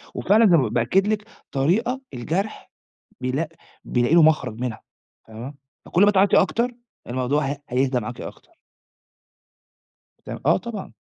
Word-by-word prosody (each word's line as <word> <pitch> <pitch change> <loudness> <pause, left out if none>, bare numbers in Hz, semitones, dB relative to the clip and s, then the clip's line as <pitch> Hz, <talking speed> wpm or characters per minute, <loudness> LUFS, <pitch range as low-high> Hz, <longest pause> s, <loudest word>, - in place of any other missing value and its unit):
وفعلًا 220 +3 +4
زى 175 -4 +6
ما 125 -6 +1
ب - - -7
بأكّد 155 - +2
لِك 215 -1 0 0.3
طريقة 225 - +1
الجرْح 170 - -3 0.5
بيلاق 135 +5 -1 0.4
بيلاقي 120 +6 +1
له 170 - +7
مخرَج 125 -7 +2
منها 120 -3 -4 0.5
فاهمة، 120 +6 -8 0.3
فكلّ 185 +4 +3
ما 205 - +6
تعيّطي 195 0 +4
أكتر 235 +6 0 0.4
الموضوع 130 +4 0
هي 140 +1 -2
هيهدا 130 0 +1
معاكِ 120 +3 -7
أكتر. - - -10 1.7
تم - - -6
آه - - +5
طبعًا. - - -7
145 Hz, 140 wpm, -23 LUFS, 125-195 Hz, 1.7 s, له